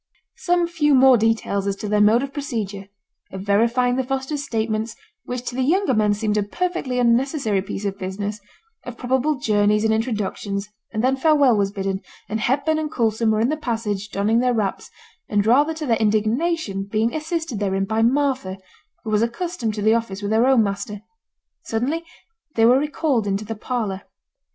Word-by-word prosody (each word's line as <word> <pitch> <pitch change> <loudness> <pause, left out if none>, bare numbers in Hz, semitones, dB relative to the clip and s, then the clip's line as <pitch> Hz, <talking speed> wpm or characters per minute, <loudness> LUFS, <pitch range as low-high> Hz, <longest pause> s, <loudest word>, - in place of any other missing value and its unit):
Some 350 -1 +1
few 310 -4 +2
more 260 0 +7
details 220 -3 0
as 200 - 0
to 210 - -6
their 210 0 +2
mode 220 +5 +5
of 275 0 -6
procedure 215 -9 -4 0.4
of 190 - -6
verifying 235 +5 +2
the 260 - +1
Fosters' 270 +3 -3
statements, 220 -2 -2 0.3
which 250 -1 -4
to 245 - -4
the 260 - 0
younger 345 +3 +2
men 210 -2 +2
seemed 210 0 -1
a - - +3
perfectly 285 - -2
unnecessary 240 -3 +2
piece 195 +1 -6
of 200 0 -3
business 200 +3 -4 0.4
of 245 -1 -8
probable 265 +4 0
journeys 210 -3 +2
and 220 0 +3
introductions, 210 -3 -2 0.2
and 220 0 -2
then 260 +1 +3
farewell 285 -4 +4
was 200 -1 +1
bidden, 195 -1 -3 0.3
and 220 +2 -2
Hepburn 285 +7 +1
and 310 -1 -3
Coulson 225 -3 +1
were 215 0 +2
in 235 - +2
the 310 - -1
passage 215 -7 -3
donning 210 +3 +1
their 250 0 +2
wraps, 205 -4 -2 0.4
and 205 -1 +1
rather 290 +8 +3
to 315 -1 -4
their 230 -4 +2
indignation 220 - 0
being 225 +2 +1
assisted 320 - -3
therein 195 -1 0
by 220 +3 0
Martha, 255 -5 +1 0.5
who 220 - -4
was 210 0 +2
accustomed 235 - -2
to 210 - -3
the 220 +1 +4
office 215 -3 -2
with 205 - -2
her 225 +3 +3
own 260 -4 +5
master. 200 0 -4 0.6
Suddenly 265 +9 -1 0.5
they 225 - +4
were 250 +3 +6
recalled 290 -6 0
into 200 +2 -1
the 225 - -4
parlour. 215 -3 -3
225 Hz, 185 wpm, -22 LUFS, 210-265 Hz, 0.6 s, more